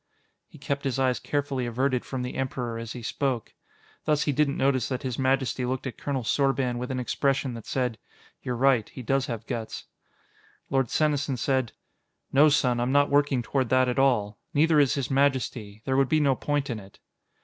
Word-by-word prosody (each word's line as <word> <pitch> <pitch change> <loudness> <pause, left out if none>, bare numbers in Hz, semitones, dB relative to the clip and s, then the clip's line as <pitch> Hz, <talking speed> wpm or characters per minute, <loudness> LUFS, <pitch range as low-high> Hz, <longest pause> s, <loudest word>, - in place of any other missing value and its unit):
He - - -15
kept 140 0 -3
his 135 -2 -1
eyes 130 -2 +1
carefully 140 -4 -2
averted 125 +2 0
from 130 -2 -4
the 125 - -4
Emperor 125 -3 -3
as 115 -1 -6
he 120 - -8
spoke. 130 -1 -2 0.5
Thus 150 -1 +2
he 145 - +1
didn't 140 0 +1
notice 130 -1 +1
that 130 -2 -3
His 130 -2 -3
Majesty 130 -1 +1
looked 130 +1 -2
at 130 - -6
Colonel 135 -3 -2
Sorban 135 -1 +1
with 125 - -4
an 130 -1 -2
expression 135 +1 0
that 115 -2 -9
said, 125 -4 -1 0.4
"You're 125 - -3
right. 130 -3 +3
He 130 - -9
does 135 +3 +1
have 115 -2 -5
guts." 115 -1 -5 0.9
Lord 135 -2 +2
Senesin 145 -3 +1
said: 130 -1 0 0.6
"No, 145 +3 +7
son; 125 -5 +2
I'm 120 +2 0
not 145 +1 +3
working 140 -3 +3
toward 130 0 -1
that 130 0 +4
at 125 +2 0
all. 110 -6 +2 0.2
Neither 155 +1 +4
is 135 -6 +3
His 140 -1 -2
Majesty. 125 -6 0
There 130 - 0
would 135 -1 +3
be 155 - +3
no 140 -3 +3
point 145 0 -1
in 115 - -3
it." 95 -1 -15
130 Hz, 195 wpm, -26 LUFS, 125-140 Hz, 0.9 s, No